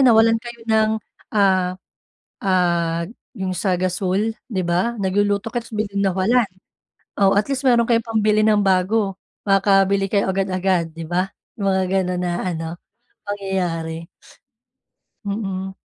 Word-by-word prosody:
nawalan 225 -3 +5
kayo 235 -1 -9
ng, 220 0 +4 0.5
ah, 185 -2 +3 0.7
ah, 170 -3 +1 0.3
'yong 185 -1 -2
sa 190 +1 0
gasul, 190 +4 0 0.2
'di 185 -2 0
ba? 210 +7 0
Nagluluto 200 +2 +1
ka 240 0 -3
tapos 235 - -16
biglang 200 -2 -1
nawalan, 225 +6 +3 0.7
oh, 195 -1 +4
at 205 +6 +1
least 270 0 -1
mayro'n 235 -2 +4
kayong 230 0 +2
pambili 215 -1 +2
ng 210 -1 +4
bago 195 +1 +1 0.3
makakabili 195 0 +3
kayo 200 0 +2
agad-agad 185 -2 0
di 165 - -5
ba? 180 +3 0 0.3
Yung 195 - +1
mga 190 -1 +2 0.2
gano'n 180 -1 -1
na 180 -1 -1 0.2
ano 165 0 -4 0.4
pangyayari. 175 -5 -3 1.2
Mm. 195 -2 -3
195 Hz, 130 wpm, -21 LUFS, 185-215 Hz, 1.2 s, nawalan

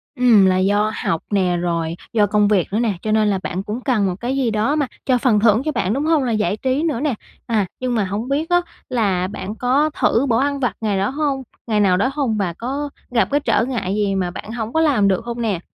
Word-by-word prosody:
Ừm, 235 -6 +5
là 185 -1 +3
do 205 +3 +2
học 165 - 0
nè, 185 -3 +1
rồi 170 -1 -2 0.2
do 215 -3 +4
công 205 0 +3
việc 200 -5 +2
nữa 220 - +1
nè, 225 -4 +1
cho 215 - -2
nên 215 0 +3
là 195 - 0
bạn 185 +2 -3
cũng 215 +5 -5
cần 235 -7 +1
một 185 - -1
cái 250 +3 -2
gì 255 -4 +1
đó 220 +7 +1
mà 290 -4 0 0.2
cho 255 -2 +3
phần 235 -4 +2
thưởng 220 +2 +4
cho 310 - 0
bạn, 200 -7 -1
đúng 285 +4 -1
hông? 315 -4 +3
Là 240 - -1
giải 215 -1 0
trí 265 +5 0
nữa 305 -8 0
nè, 295 -2 0 0.3
à, 220 -4 +1
nhưng 255 -1 -1
mà 210 -4 +1
hổng 210 +7 -4
biết 305 +5 -1
á 350 0 +4 0.3
là 200 -7 0
bạn 200 +1 -6
có 270 +6 +2
thử 240 +5 +3
bỏ 225 - +3
ăn 280 +1 0
vặt 245 -7 0
ngày 205 -3 0
đó 195 - 0
hông 275 -1 -1 0.2
ngày 215 -2 +1
nào 185 -3 +3
đó 255 - +1
hông? 265 -7 -1
Và 185 -4 -1
có 275 - -4 0.2
gặp 235 - +2
cái 290 - +3
trở 280 - +1
ngại 225 -7 -2
gì 205 -2 0
mà 180 -2 -1
bạn 210 - -8
hổng 230 -1 -4
có 320 - +2
làm 260 -11 +3
được 195 +3 0
hông 235 0 -4
nè? 210 -6 -1
225 Hz, 265 wpm, -20 LUFS, 200-260 Hz, 0.3 s, Ừm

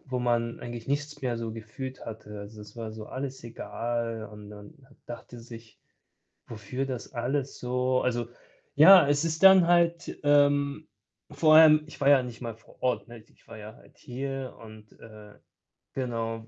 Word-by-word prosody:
wo 130 -1 -3
man 120 -1 -1
eigentlich 120 0 -8
nichts 145 +1 -3
mehr 125 -2 -1
so 115 -1 -5
gefühlt 130 +4 -8
hatte. 105 -2 -8
Also, 105 +1 -11
es 105 +3 -15
war 110 -2 -6
so 110 -1 -9
alles 130 -1 -6
egal 115 -1 -4
und 105 -1 -12
man 105 +8 -12 0.3
dachte 120 0 -10
sich, 115 -1 -13 0.7
wofür 115 +5 -5
das 130 -3 -6
alles 130 +3 -2
so 125 +1 0
also, 120 -2 -1 0.5
ja, 175 +1 +9
es 145 +2 +1
ist 160 +1 -3
dann 190 -2 +8
halt, 170 -1 +1
ähm 145 +1 +2 0.4
vorher 155 +1 +6
ich 155 - -14
war 140 - +2
ja 135 -2 +6
nicht 120 -2 -9
mal 115 -1 -5
vor 115 - -23
Ort, 125 -1 -1
ne? 120 - -11
Ich - - -28
war 115 -1 -10
ja 105 +1 -10
halt - - -22
hier 135 +1 -6
und, 110 -1 -14
äh 105 -2 -14 0.6
genau. 115 -3 -4
120 Hz, 170 wpm, -27 LUFS, 115-140 Hz, 0.7 s, ja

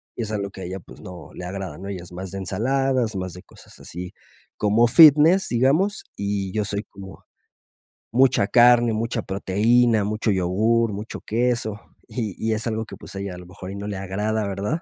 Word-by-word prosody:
y 120 - -3
es 110 - -5
algo 100 -2 -3
que 95 - -10
a - - -5
ella 95 +2 -5
pues - - -15
no 90 -1 -10
le 90 - -7
agrada, 95 +1 -6
¿no? 95 +3 -8
Ella 95 -3 -5
es 90 - -13
más 90 +1 -7
de 95 - -5
ensaladas, 125 +4 0
más 95 -1 -3
de 90 - -11
cosas - - -17
así. 90 +1 -8 0.4
Como 105 +3 +3
fitness, 160 +6 +7
digamos, 150 - +2
y 100 -1 -2
yo 105 -1 0
soy 100 +1 -3
como 95 -1 -12 0.9
mucha 125 -3 +4
carne, 120 0 +5
mucha 115 0 -2
proteína, 110 +4 +2
mucho 110 +1 -1
yogur, 105 +5 +1
mucho 105 +3 -6
queso, 115 -2 -1 0.3
y 110 -7 -4
y 110 0 0
es 110 +2 -2
algo 110 0 -2
que - - -10
pues - - -11
a - - -4
ella 100 -1 -5
a - - -10
lo 90 - -12
mejor 90 +1 -9
y - - -7
no 100 +1 -6
le 100 - -4
agrada, 105 +3 -2
¿verdad? 100 - -2
105 Hz, 205 wpm, -23 LUFS, 95-120 Hz, 0.9 s, fitness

